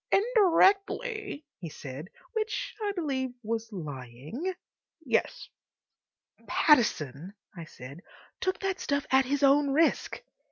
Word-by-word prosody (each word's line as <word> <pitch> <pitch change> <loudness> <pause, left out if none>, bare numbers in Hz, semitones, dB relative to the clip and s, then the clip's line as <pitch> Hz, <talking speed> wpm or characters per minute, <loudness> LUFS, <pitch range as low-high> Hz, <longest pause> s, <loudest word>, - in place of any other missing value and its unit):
"Indirectly," 405 -2 +3
he 170 - -6
said, 145 +3 -8 0.2
which 445 +2 -2
I 415 -1 0
believe 265 -8 -2
was 225 +1 -3
lying, 150 - -5 0.5
"yes." - - 0 1.0
"Pattison," 185 - +2 0.2
I 170 -2 -7
said, 140 +2 -11 0.4
"took 375 0 0
that 385 -1 -1
stuff 285 -1 -1
at 265 0 +5
his 285 +2 -1
own 280 +1 +5
risk." 315 +4 +1
275 Hz, 110 wpm, -29 LUFS, -, 1.0 s, at